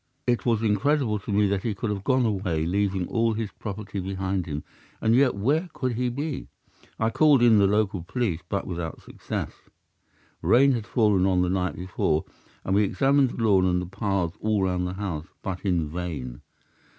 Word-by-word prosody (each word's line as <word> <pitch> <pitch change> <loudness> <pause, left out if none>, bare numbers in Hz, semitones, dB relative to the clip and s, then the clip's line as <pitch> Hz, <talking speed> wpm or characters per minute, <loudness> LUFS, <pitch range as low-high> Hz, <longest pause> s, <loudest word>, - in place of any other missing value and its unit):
It 120 0 0
was 115 -2 +2
incredible 110 +1 +1
to 100 - -6
me 100 +1 +3
that 100 -1 0
he 110 -2 -2
could 110 +1 -2
have 100 -2 -4
gone 130 0 +2
away 95 -7 -1
leaving 95 0 0
all 115 -1 +1
his 110 -2 -3
property 100 -1 -6
behind 95 -1 -2
him, 75 -1 -4 0.4
and 110 - +2
yet 130 -1 +4
where 145 - 0
could 130 -1 -2
he 125 +2 0
be? 140 +3 -4 0.5
I 115 0 +1
called 145 -2 +5
in 115 -3 +6
the 100 - +5
local 100 -2 +1
police, 100 -1 -2
but 100 - -2
without 85 -3 -5
success. - - -5 0.9
Rain 135 +3 +5
had 115 -4 -2
fallen 105 -6 +3
on 90 -1 +2
the 90 - 0
night 95 -1 -1
before 90 -4 -1 0.4
and 95 - 0
we 100 - +4
examined 135 +6 +3
the 115 - -4
lawn 100 -4 +4
and 90 0 +2
the 90 - -3
paths 95 -2 -2
all 105 -2 +1
round 90 -1 0
the 90 - -4
house, 90 -5 -4 0.2
but 95 -2 -3
in 90 -6 0
vain. 75 -7 -5
100 Hz, 190 wpm, -25 LUFS, 90-115 Hz, 0.9 s, in